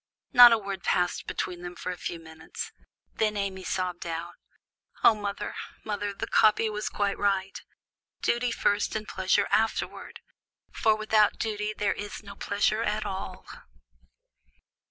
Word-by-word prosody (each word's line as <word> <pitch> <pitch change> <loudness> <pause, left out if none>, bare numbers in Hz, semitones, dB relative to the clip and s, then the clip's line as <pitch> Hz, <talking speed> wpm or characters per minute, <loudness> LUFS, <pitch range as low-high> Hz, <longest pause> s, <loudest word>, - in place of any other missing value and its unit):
Not 245 -1 +11
a 230 - +5
word 195 -3 -5
passed 180 0 0
between 175 -1 -3
them 175 0 -7
for 185 - -4
a - - -4
few 170 - -4
minutes; 160 -1 -8 0.4
then 215 -1 0
Amy 195 -2 -3
sobbed 180 -2 -3
out, 165 +1 -4 0.7
"O - - +8
mother! 205 -1 -4 0.3
mother! 205 -1 -2
the 195 - -4
copy 215 0 +4
was 210 0 -3
quite 200 -1 -1
right, 195 -1 0 0.6
'Duty 240 +1 +1
first, 205 -2 +1
and 215 0 -3
pleasure 190 +2 +1
afterward;' 225 0 -1 0.5
for 220 -1 +2
without 215 -1 +3
duty 210 -1 -2
there 200 -2 +1
is 205 +1 -7
no 200 -1 -9
pleasure 210 +2 0
at 215 -1 -1
all." 190 0 -5
205 Hz, 145 wpm, -27 LUFS, 190-215 Hz, 0.7 s, Not